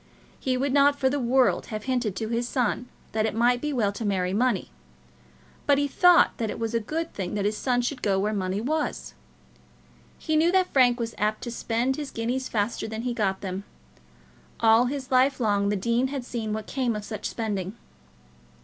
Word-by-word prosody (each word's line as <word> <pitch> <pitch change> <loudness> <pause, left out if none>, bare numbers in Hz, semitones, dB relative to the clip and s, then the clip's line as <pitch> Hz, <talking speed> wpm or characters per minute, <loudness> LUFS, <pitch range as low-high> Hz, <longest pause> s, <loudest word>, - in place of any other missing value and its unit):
He 255 -1 0
would 270 +1 0
not 285 0 +5
for 265 -2 +2
the 285 - 0
world 255 +1 +2
have 215 -1 -5
hinted 245 -6 -1
to 220 +3 -3
his 235 +1 -1
son 250 -1 -1 0.2
that 220 0 +1
it 215 - -3
might 245 +2 +3
be 300 - -2
well 225 -7 +1
to 205 +3 -6
marry 185 -3 0
money; 235 -2 0 1.0
but 285 - +5
he 285 0 +1
thought 355 +4 +5
that 225 -2 -2
it - - -4
was 225 0 -3
a 230 - +2
good 320 +9 -4
thing 185 -1 -4
that 200 -1 -1
his 210 +1 +1
son 245 +1 0
should 250 +1 -3
go 195 -2 +1
where 210 +2 0
money 190 0 -1
was. 305 +5 -2 1.0
He 315 - -2
knew 325 +3 +4
that 375 -1 +2
Frank 245 -2 +4
was 230 -1 -3
apt 215 +1 0
to 240 - -4
spend 240 +3 -1
his 295 -2 -4
guineas 245 +3 -2
faster 215 +1 -1
than 220 +1 -5
he 245 -1 -1
got 195 -4 -1
them. 190 0 -4 1.0
All 225 +1 +5
his 265 0 -5
life 260 +2 +3
long 205 -3 +1
the 205 - +1
dean 235 +6 +1
had 265 -2 -5
seen 225 -4 -4
what 215 0 -3
came 250 -4 -1
of 210 -1 -5
such 215 -1 -4
spending. 205 -2 -3
235 Hz, 205 wpm, -26 LUFS, 210-265 Hz, 1.0 s, not